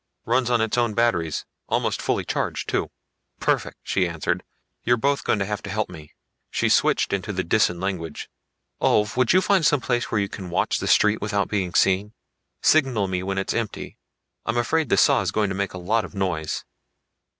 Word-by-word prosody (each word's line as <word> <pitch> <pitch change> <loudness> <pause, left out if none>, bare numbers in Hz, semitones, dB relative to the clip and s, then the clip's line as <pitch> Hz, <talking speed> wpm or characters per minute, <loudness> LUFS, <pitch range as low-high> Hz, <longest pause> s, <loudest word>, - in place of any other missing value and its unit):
"Runs 120 +1 +1
on 120 -2 +2
its 110 +2 +1
own 115 -3 0
battery; 90 -9 +1 0.4
almost - - 0
fully - - -1
charged - - -2
too." - - -1 0.5
"Perfect," - - 0
she 95 - +1
answered. 85 -3 -2 0.4
"You're 120 +1 +3
both 140 +4 0
going - - +1
to 100 - -1
have 105 +1 -3
to 100 - -8
help 110 +1 -2
me." 75 -3 -12 0.3
She - - 0
switched - - +2
into 100 +2 -2
the 95 -2 -2
Disan 90 -1 +2
language. 85 -5 -4 0.5
"Ulv, 105 0 +2
would 125 -1 +3
you 185 - +5
find 190 -2 +2
some 145 -1 +4
place 120 -1 -1
where 105 - +1
you 100 - 0
can 95 -2 -8
watch 85 - 0
the - - -3
street 105 +1 +4
without 100 -2 -1
being 95 -3 -2
seen? 100 +3 +2 0.5
Signal 130 -10 +3
me 90 -1 -1
when 95 +1 -3
it 95 - -1
is - - +1
empty. 115 -3 -6 0.4
I'm 115 +1 -2
afraid 155 +7 +1
this - - +4
saw 140 -5 +4
is - - -1
going 105 -2 0
to 95 - -3
make 100 -1 -2
a - - -5
lot 105 +5 0
of - - -10
noise." 85 -5 -2
105 Hz, 205 wpm, -24 LUFS, 95-120 Hz, 0.5 s, you